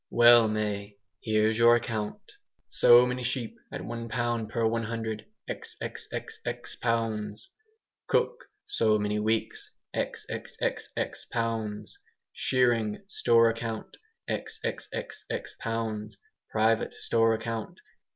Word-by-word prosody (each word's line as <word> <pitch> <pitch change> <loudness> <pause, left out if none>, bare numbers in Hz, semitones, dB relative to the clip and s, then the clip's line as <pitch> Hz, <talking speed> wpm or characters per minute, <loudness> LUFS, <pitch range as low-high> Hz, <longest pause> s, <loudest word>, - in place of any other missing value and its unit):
"Well, 120 -1 +7
May, 105 -1 -2 0.2
here's 110 +1 +2
your 120 0 +8
account": 110 -3 -3 0.4
So 120 +1 +7
many 125 0 -2
sheep, 125 -1 -2 0.2
at - - -5
1 115 0 -5
pound 120 -2 -1
per 115 0 0
100... 110 -1 -2 0.2
xxxx 120 0 -5
pounds 110 -2 -1 0.6
Cook, 485 +1 +1 0.2
so 110 - +2
many 105 0 0
weeks................. 110 +1 -1 0.3
xxxx - - -3
pounds 110 -2 -2 0.3
Shearing 120 - +2
store 115 -9 +5
account.............. 115 -1 -5 0.3
xxxx 460 +2 -5
pounds 110 -2 -3 0.3
Private 110 +1 +2
store 115 -1 +3
account............... 110 0 -4
115 Hz, 95 wpm, -29 LUFS, 110-120 Hz, 0.6 s, your